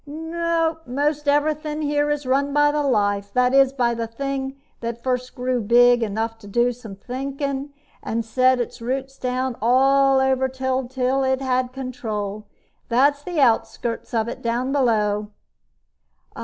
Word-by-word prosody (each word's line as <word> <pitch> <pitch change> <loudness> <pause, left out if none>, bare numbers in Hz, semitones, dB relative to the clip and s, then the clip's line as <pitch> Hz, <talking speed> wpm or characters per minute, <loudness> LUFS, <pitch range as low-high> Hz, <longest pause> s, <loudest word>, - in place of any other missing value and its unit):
"Nope. 325 +1 -2
Most 290 +3 -1
everything 300 +1 0
here 290 0 +1
is 295 -1 -1
run 275 +2 +1
by 295 0 +4
the 295 0 0
Life 205 -6 0
that 250 0 +3
is, 270 -1 +5
by 245 -3 +1
the 230 -1 -3
thing 270 +3 -4 0.2
that 235 0 -5
first 250 -1 -2
grew 250 -1 -1
big 240 +2 +5
enough 225 +1 -2
to 205 - -13
do 240 +4 +2
some 225 -5 -10
thinking, 275 +4 -4 0.3
and 230 0 -3
set 255 +3 +3
its 240 - -4
roots 265 +3 -4
down 255 0 -2
all 270 +3 +4
over 265 0 +2
until 260 0 -1
it 265 0 +1
had 255 -1 0
control. 220 -6 -5 0.4
That's 280 +4 +3
the 345 +1 -3
outskirts 235 -2 0
of 225 -1 0
it 235 - -6
down 240 +3 -1
below." 210 -6 +1
260 Hz, 150 wpm, -22 LUFS, 235-275 Hz, 0.4 s, is